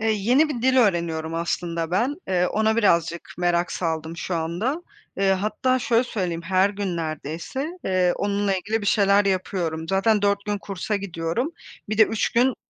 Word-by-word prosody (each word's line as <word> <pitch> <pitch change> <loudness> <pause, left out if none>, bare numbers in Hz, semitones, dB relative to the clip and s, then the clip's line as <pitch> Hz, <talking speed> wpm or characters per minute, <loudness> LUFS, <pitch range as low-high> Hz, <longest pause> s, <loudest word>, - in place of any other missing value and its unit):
Eee, 225 0 +1
yeni 245 +10 +3
bir 245 -5 -4
dil 260 0 +3
öğreniyorum 170 -7 +1
aslında 170 0 -2
ben. 240 +10 +1
Eee, 180 -1 +2
ona 220 +2 +1
birazcık 170 -5 +1
merak 175 0 +1
saldım 160 -1 -3
şu 180 - -3
anda. 185 - -2 0.3
Eee, 195 0 +3
hatta 215 +7 0
şöyle 240 0 +2
söyleyeyim, 180 -8 -3
her 190 +3 +2
gün 195 -4 -3
neredeyse, 165 - -4
eee, 185 -2 +2
onunla 200 -1 0
ilgili 215 +4 -2
bir 205 - -5
şeyler 200 -1 +4
yapıyorum. 175 -4 -1
Zaten 205 +2 +2
4 200 0 +1
gün 205 -1 -2
kursa 200 +1 -3
gidiyorum. 190 - -2 0.4
Bir 215 0 -2
de - - +9
3 220 0 -1
gün 250 +2 +3
195 Hz, 170 wpm, -24 LUFS, 170-220 Hz, 0.4 s, de